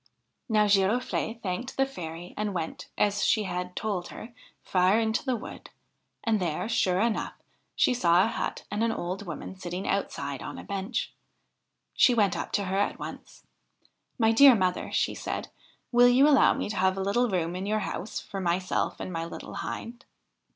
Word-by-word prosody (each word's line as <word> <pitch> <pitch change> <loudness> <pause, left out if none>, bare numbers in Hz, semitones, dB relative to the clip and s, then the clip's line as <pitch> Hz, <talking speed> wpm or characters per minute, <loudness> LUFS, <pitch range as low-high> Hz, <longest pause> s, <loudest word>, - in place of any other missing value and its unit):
Now 215 -1 +4
Girofle'e 210 +3 +1
thanked 195 +7 -4
the 270 - +4
fairy 175 -9 -8
and 210 -2 -2
went, 165 -2 -4
as 205 0 +1
she 215 - +3
had 180 -1 -4
told 200 -5 -2
her, 235 +2 -10 0.3
far 185 +3 +3
into 220 0 0
the 260 -2 0
wood; 225 - -9 0.5
and 220 -2 +2
there, 170 +1 -2
sure 190 -5 +1
enough, 225 +1 0 0.4
she - - +3
saw 180 -6 +4
a - - +2
hut - - -3
and 210 +2 0
an 230 - +2
old 185 0 -4
woman 170 +3 -6
sitting 180 0 -5
outside 140 -8 -2
on - - -6
a - - -8
bench. 200 +4 -3 0.8
She 245 - +5
went 205 -4 +3
up - - -4
to 205 - +1
her 190 +1 -1
at 205 - 0
once. - - -9 0.4
' - - -41 0.3
My 225 -3 +4
dear 265 +3 +8
mother,' 185 -3 0
she - - +1
said, - - -4 0.2
' - - -39
will 245 0 +6
you 260 +4 +6
allow 285 -3 +5
me - - -2
to 205 - -5
have 190 +1 +2
a - - -1
little 240 +5 +1
room 175 -3 -1
in 190 +2 -4
your 215 +1 0
house 195 +1 -4
for 195 - -6
myself 180 +1 -1
and 185 - -5
my 165 0 -2
little 170 - -8
Hind?' 240 +2 -6
200 Hz, 190 wpm, -28 LUFS, 180-225 Hz, 0.8 s, dear